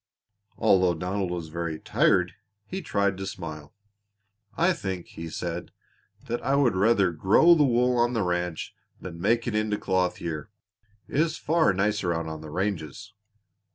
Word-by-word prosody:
Although 95 -5 +3
Donald 90 +3 -2
was 85 -3 -4
very 85 -1 -3
tired 90 -1 +2 0.3
he 190 - -5
tried 100 - 0
to 95 - -4
smile. 80 -6 -7 0.9
"I 170 +3 +3
think," 95 - -5
he 80 0 -7
said, 85 +2 -4 0.6
"that 120 - -3
I 135 +3 +2
would 135 -7 +3
rather 100 -1 +3
grow 100 - +5
the 155 -3 +4
wool 125 0 +2
on 120 +1 +2
the 115 -4 +1
ranch 90 -2 -2 0.3
than 85 -2 -8
make 115 +4 +2
it 120 - -2
into 105 -1 0
cloth 95 -2 0
here. 80 +1 -5 0.6
It - - -2
is 160 0 +1
far 160 -5 +2
nicer 100 -2 0
out 80 0 -2
on 80 -1 -6
the 80 - -9
ranges." 95 +3 -4
95 Hz, 160 wpm, -26 LUFS, 85-115 Hz, 0.9 s, grow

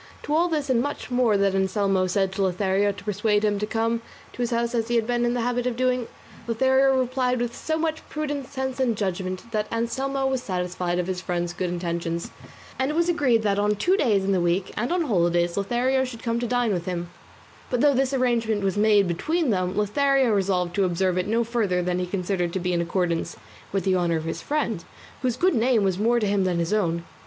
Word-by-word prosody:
To 295 - -2
all 335 +3 +3
this 305 -4 -1
and 250 -3 +2
much 285 -1 -4
more 245 -4 +3
that 195 -1 +2
Anselmo 190 0 +1
said 190 0 +1
to 190 - -3
Lothario 195 +2 +1
to 200 -1 -11
persuade 210 +1 +1
him 205 -1 +1
to 210 - -2
come 230 +1 0 0.3
to - - -6
his 240 - 0
house 235 0 -1
as 230 -2 0
he 240 - 0
had 230 -2 +2
been 240 0 0
in 240 0 0
the 245 - 0
habit 245 +1 0
of 245 - -1
doing, 250 -1 0 0.4
Lothario 265 +3 +3
replied 255 0 0
with 240 0 -2
so 315 0 -2
much 320 -1 -2
prudence, 290 -3 -3
sense, 265 -1 -4
and 240 -5 +1
judgment, 185 +2 -3
that 215 -1 -2
Anselmo 270 +4 -1
was 265 -1 0
satisfied 180 -3 -2
of 180 - 0
his 185 0 -3
friend's 175 -2 -2
good 185 0 -2
intentions, 170 -1 -3 0.5
and 265 +1 +1
it 300 - -2
was 340 +1 +2
agreed 255 -10 +2
that 200 -1 +1
on 210 +1 +2
two 360 - +2
days 220 - +2
in 195 - 0
the 185 -2 +2
week, 175 +2 0
and 240 +6 -2
on 355 -1 +1
holidays, 175 - +1
Lothario 245 +6 +1
should 245 -3 -7
come 230 -1 0
to 240 - -2
dine 245 -2 +1
with 175 -2 -3
him; 175 -1 -4 0.6
but 245 -1 0
though 290 -1 +5
this 265 0 +1
arrangement 235 -5 +1
was 195 0 0
made 205 -2 +4
between 305 - 0
them 185 -1 -1
Lothario 265 +4 +2
resolved 185 -3 +1
to 200 - +3
observe 185 0 +1
it 180 - -2
no 230 +2 +2
further 215 -6 0
than 180 0 -1
he 180 - -2
considered 180 -1 -1
to 190 - -1
be 180 0 -1
in 170 - +1
accordance 170 -1 -1 0.4
with 195 -1 -1
the 190 -1 +2
honour 170 -2 +1
of 160 - -4
his 165 - -4
friend, 235 - -2 0.4
whose 250 -3 0
good 370 +1 +3
name 235 -3 +2
was 190 -1 0
more 235 +3 +3
to 215 - 0
him 200 -1 +1
than 180 -2 0
his 170 +3 -1
own. 170 -5 0
215 Hz, 230 wpm, -24 LUFS, 185-250 Hz, 0.6 s, though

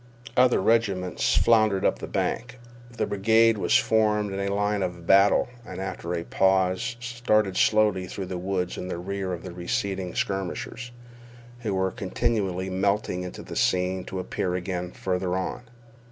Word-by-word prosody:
Other 125 0 +5
regiments 95 -4 +1
floundered 110 -4 +3
up - - +2
the - - -6
bank. 120 +1 -2 0.3
The 120 - -2
brigade 110 +2 +3
was - - +4
formed 105 -2 +2
in 100 0 -2
line 105 +1 0
of 90 -2 -4
battle, 100 +3 +5 0.2
and - - -8
after 90 -2 -4
a 85 - -3
pause 95 +5 +1
started 120 -5 0
slowly 105 -4 +3
through 95 - -5
the 90 -1 -5
woods 90 -1 -2
in 90 - -5
the 90 - -4
rear 95 +1 -4
of 85 -2 -5
the 90 - -7
receding 90 +1 -3
skirmishers, 95 +5 -3 0.7
who 105 -5 -2
were 95 0 +1
continually 95 -2 -1
melting 95 0 0
into 90 0 -7
the - - -8
scene 90 0 +1
to 95 - -6
appear 90 0 -2
again 90 -1 -3
farther 90 -1 -2
on. 95 - -3
95 Hz, 155 wpm, -26 LUFS, 90-105 Hz, 0.7 s, Other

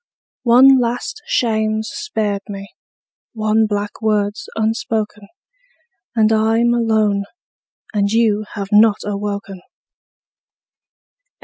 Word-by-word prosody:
One 260 +3 +7
last 245 - -3
shame's 220 - 0
spared 220 - -2
me, 200 0 -7 0.6
one 215 0 +1
black 205 +1 -4
word's 210 -1 -1
unspoken; 220 -2 -2 0.9
And 220 -1 +3
I'm 225 +2 +2
alone; 215 -4 +1 0.7
and 200 -1 +1
you 215 -2 +2
have 200 -2 -5
not 210 0 +5
awoken. 200 -2 -4
215 Hz, 90 wpm, -18 LUFS, 205-225 Hz, 0.9 s, One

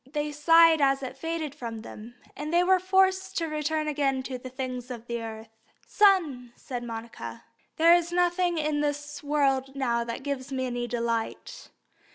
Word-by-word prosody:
They 300 0 -2
sighed 330 +1 +5
as 275 0 +3
it 260 0 -5
faded 320 0 -4
from 230 -4 -6
them, 225 +2 -11 0.2
and 300 +2 -5
they 345 +1 +4
were 375 +1 +4
forced 380 0 +2
to 330 - 0
return 305 0 -1
again 275 -3 0
to 255 -1 -5
the 255 - -8
things 255 -1 -5
of 240 -2 -7
earth. 225 -1 -5 0.4
"Son," 320 - +2
said 245 -3 -6
Monica, 230 0 -7 0.3
"there 335 +1 +7
is 345 -1 +2
nothing 350 0 +1
in 300 -1 0
this 290 0 -3
world 275 -2 0
now 235 -4 0
that 235 +3 -6
gives 280 -1 -4
me 260 -1 -1
any 245 -1 -3
delight. 230 -1 -3
280 Hz, 170 wpm, -27 LUFS, 245-325 Hz, 0.4 s, there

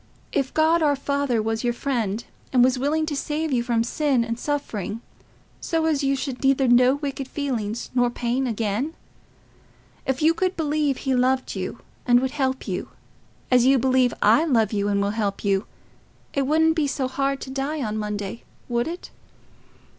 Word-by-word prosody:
If 275 -2 0
God 320 +2 +3
our 290 -2 +3
Father 275 -4 0
was 225 +1 -2
your 240 0 +1
friend, 235 -5 -1 0.3
and 250 -2 +5
was 255 0 +3
willing 305 +4 +1
to 305 -2 -3
save 300 +2 -2
you 245 - +2
from 235 -1 +1
sin 265 -1 +1
and 230 +1 -4
suffering, 230 -8 -3 0.6
so 325 -1 -1
as 305 -3 +1
you 275 0 +2
should 270 -1 -4
neither 270 0 +3
know 250 +2 +5
wicked 280 -2 -4
feelings 240 -6 -3
nor 245 -1 +3
pain 245 +2 -1
again? 225 +6 -2 1.1
If 265 +2 0
you 320 +1 +5
could 370 +2 -1
believe 300 -3 0
he 265 - -1
loved 255 +1 +1
you - - -5 0.3
and 245 0 +6
would 260 0 -1
help 265 -2 -1
you, - - -3 0.6
as 250 0 +5
you 270 0 +6
believe 255 0 +3
I 225 +9 +5
love 235 -9 +2
you 205 -1 0
and 200 -1 +1
will 200 - 0
help 205 -2 -2
you, 195 0 +1 0.7
it 275 -2 0
wouldn't 320 +2 +3
be 310 -3 +1
so 275 -2 -1
hard 275 +1 -1
to 265 - -6
die 275 +2 -2
on 215 -2 -2
Monday, 210 +1 -4 0.2
would 240 +2 0
it?" 345 +2 -7
260 Hz, 180 wpm, -24 LUFS, 235-285 Hz, 1.1 s, and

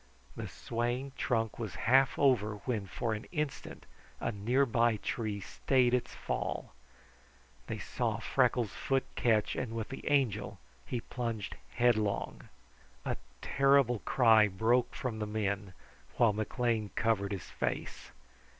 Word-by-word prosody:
The - - -5
swaying 120 +4 -2
trunk 115 -4 -1
was 110 -6 -4
half 135 +2 +5
over 115 -7 +3
when, 110 -6 -1
for 115 +4 -2
an 110 +1 -5
instant, 150 -5 -4 0.3
a - - -1
near 120 +7 +2
by 115 -2 +2
tree 105 -1 -3
stayed 125 +5 +1
its 125 - 0
fall. - - -3 0.9
They - - -3
saw - - -2
Freckles' 120 -5 +1
foot 135 -1 0
catch, 110 -3 +2
and 115 - -3
with 110 -1 -3
the 135 - -5
Angel 110 -9 +1 0.3
he 120 -2 -2
plunged 115 -5 -4 0.2
headlong. 110 -4 +1 0.6
A - - 0 0.3
terrible 135 -4 +4
cry 110 -3 +5
broke 110 +6 +1
from 115 -4 -3
the 105 - -2
men, 100 -2 -2 0.4
while 115 -3 +5
McLean 110 0 -1
covered 105 -4 +1
his 95 -6 -5
face. - - -4
115 Hz, 130 wpm, -32 LUFS, 105-125 Hz, 0.9 s, half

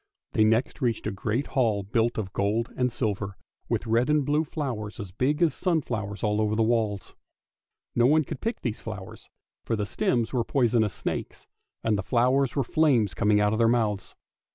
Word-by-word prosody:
They 110 - +4
next 110 +3 +1
reached 120 -4 0
a - - -1
great 110 +7 -2
hall 110 -7 +2
built 115 +4 0
of 95 -4 -4
gold 105 +4 0
and 125 -1 +1
silver, 100 -5 -2 0.3
with - - -1
red 115 +4 +2
and 150 -2 +3
blue 150 +2 +2
flowers 125 -10 -4
as 100 -4 -6
big 145 - +1
as 165 - +3
sunflowers 120 - -2
all 105 0 +1
over 110 0 +1
the 115 - +2
walls. 110 -3 -1 0.8
No 120 0 +4
one 155 +3 +4
could 150 0 -7
pick 230 +2 -2
these 120 -3 -3
flowers, 105 -4 -8 0.3
for 115 - -1
the 105 -1 -1
stems 115 +3 0
were 120 -2 +1
poisonous 115 -6 +1
snakes, - - -4 0.4
and 110 -2 +1
the - - 0
flowers 125 +4 +2
were 140 - +2
flames 125 - +2
coming 105 +5 +3
out 105 0 +2
of 110 - -1
their 115 - +5
mouths. 110 -4 0
115 Hz, 190 wpm, -26 LUFS, 105-130 Hz, 0.8 s, their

